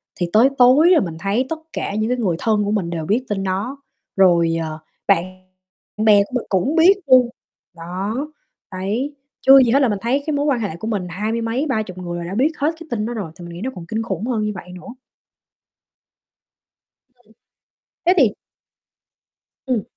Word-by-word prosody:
thì 175 -1 -2
tới 235 +5 +6
tối 260 +7 +6
là 340 - +6
mình 165 -3 -3
thấy 205 +8 0
tất 320 -1 -3
cả 200 - -3
những 215 +2 -1
cái 250 - 0
người 190 -8 0
thân 215 -2 +1
của 205 - -1
mình 190 -6 -1
đều 165 -2 -4
biết 240 +8 0
tin 195 -2 -2
đó. 200 +9 -3 0.4
Rồi, 170 -3 +4
ờ, 155 0 -5 0.3
bạn 170 - +4 0.7
bè 210 -2 +5
của - - -15
mình 250 - -1
cũng 200 - 0
biết 345 +4 +7
luôn, 255 -2 +6 0.5
đó, 185 +6 -4 0.6
đấy, 215 +10 -3 0.3
chưa 270 0 +8
gì 235 - +1
hết 275 - +4
là 265 - +3
mình 205 -2 -2
thấy 265 +5 0
cái 310 - -1
mối 285 +1 0
quan 270 -5 +1
hệ 200 -7 -3
của 220 - -6
mình 200 -5 -2
hai 210 +6 -3
mươi 230 0 -2
mấy, 235 +6 -1
30 215 -7 -2
người 175 -1 -5
là 170 - -5
đã 180 +4 -5
biết 280 +7 +2
hết 295 +3 +1
cái 330 - -11
tin 215 -2 -1
đó 240 - -4
rồi, 195 -8 -5
thì 175 -2 -11
mình 170 - -9
nghĩ 175 - -8
nó 260 - -2
còn 170 -2 -8
kinh 220 +4 -2
khủng 225 -1 -4
hơn 230 -4 -1
như 210 - -1
vậy 180 0 -9
nữa. 240 +7 -10 2.1
Ừm. 250 -1 -35 0.8
Thế 360 - +4
thì 255 -10 +5 1.4
Ừm. 245 -6 0
215 Hz, 205 wpm, -20 LUFS, 185-255 Hz, 2.1 s, chưa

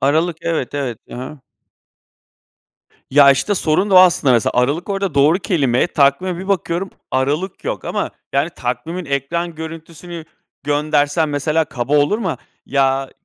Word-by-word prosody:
Aralık. 155 +5 +1
Evet, 160 -6 -2
evet, 130 -6 -3
ha - - -7
ha. 130 +3 -8 1.7
Ya, 140 0 +7
işte, 140 +9 +1
sorun 185 +3 +1
da - - +3
o - - +10
aslında. 175 -7 +5
Mesela 120 -2 +2
aralık 140 +9 0
orada 195 -4 -2
doğru 145 +5 +4
kelime, 140 - +1
takvime 170 +3 +1
bir 190 +2 -7
bakıyorum, 190 -1 -1 0.2
aralık 145 +8 -1
yok - - -3
ama, - - -2 0.2
yani, 140 +5 +1
takvimin 140 +8 -4
ekran 160 +5 -2
görüntüsünü 165 +1 -8 0.4
göndersem 150 +1 +1
mesela, 155 +3 0
kaba 135 0 -1
olur 145 +9 +2
mu? 185 -8 -2 0.3
Ya, 135 -1 +1
155 Hz, 145 wpm, -18 LUFS, 140-175 Hz, 1.7 s, o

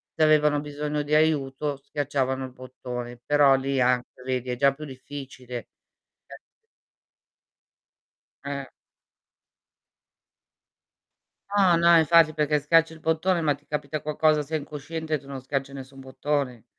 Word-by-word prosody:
se 160 - +2
avevano 150 -1 +4
bisogno 150 0 -3
di 150 +1 -4
aiuto 150 -2 +1
schiacciavano 135 -1 -2
il 130 - -9
bottone, 125 -1 -7
però 145 -2 +5
lì 135 0 -1
anche 125 0 0
vedi 130 -1 -2
è 125 - -1
già 140 +1 +4
più 150 +2 -10
difficile. 130 -2 -8 2.8
Eh. 140 -1 -5 2.9
No, 185 -4 +5
no 170 0 +6
infatti 160 -1 +5
perché 150 0 +1
schiacci 165 +2 +3
il 160 - -13
bottone, 165 +3 +1
ma 150 -3 +2
ti - - -18
capita 150 0 -4
qualcosa, 150 0 +2
sei 155 +2 -3
incosciente 155 +2 -5
e - - +1
tu 135 - -18
non 135 -1 -7
schiacci 135 +1 -3
nessun 135 0 -10
bottone. 130 -3 -3
145 Hz, 130 wpm, -25 LUFS, 130-155 Hz, 2.9 s, no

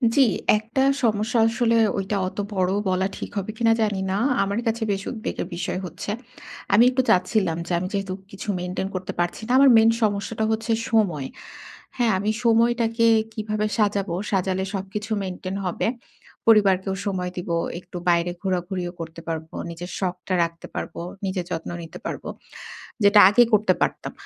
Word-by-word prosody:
জি, 280 - +5 0.4
একটা 225 +5 -2 0.2
সমস্যা 220 +1 +1
আসলে 230 0 +1 0.2
ঐটা 195 +1 -2
অতো 205 - -4
বড়ও 190 +1 +1
বলা 185 +1 +1
ঠিক - - -6
হবে 200 +2 -2
কিনা 230 -1 +4
জানি 210 -3 +1
না। 195 - 0 0.3
আমার 200 +3 -1
কাছে 225 0 0
বেশ 195 0 -1
উদ্বেগের 220 -6 -4
বিষয় 175 +1 -3
হচ্ছে, 180 +4 -5 0.6
আমি 225 +4 +7
একটু 260 0 +1
চাচ্ছিলাম 185 -2 +2
যে - - -6
আমি 185 - -3
যেহেতু 195 -1 -2 0.2
কিছু 195 +2 -8
maintain 180 +2 -3
করতে 185 0 -4
পারছি 175 +4 -1
না। - - -2
আমার 275 0 +7
main 225 0 +6
সমস্যাটা 210 +1 0
হচ্ছে 225 +1 -1 0.2
সময়। 175 -12 +1 0.7
হ্যাঁ, 235 -3 +3
আমি 210 +3 0
সময়টাকে 230 0 +3 0.3
কিভাবে 215 -1 -2
সাজাবো, 200 -4 +1 0.2
সাজালে 190 0 0
সবকিছু 205 +3 -5
maintain 185 +1 -5
হবে? 180 - -1 0.6
পরিবারকেও 195 -3 +4
সময় 180 -2 -2
দিবো, 175 -1 -2 0.2
একটু 180 0 -10
বাইরে 170 0 +2
ঘোরাঘুরিও 180 -1 -2
করতে 165 0 -7
পারবো। 160 -1 -5
নিজের 170 +2 -7
শখটা 185 0 -3
রাখতে 170 0 -5
পারবো, - - -5 0.2
নিজের 185 -2 -2
যত্ন 165 -1 -3
নিতে 160 - -10
পারবো। - - -5 0.7
যেটা 205 +1 +7
আগে 240 +4 +6
করতে 210 -3 +4
পারতাম। - - -1
195 Hz, 160 wpm, -24 LUFS, 180-220 Hz, 0.7 s, আমি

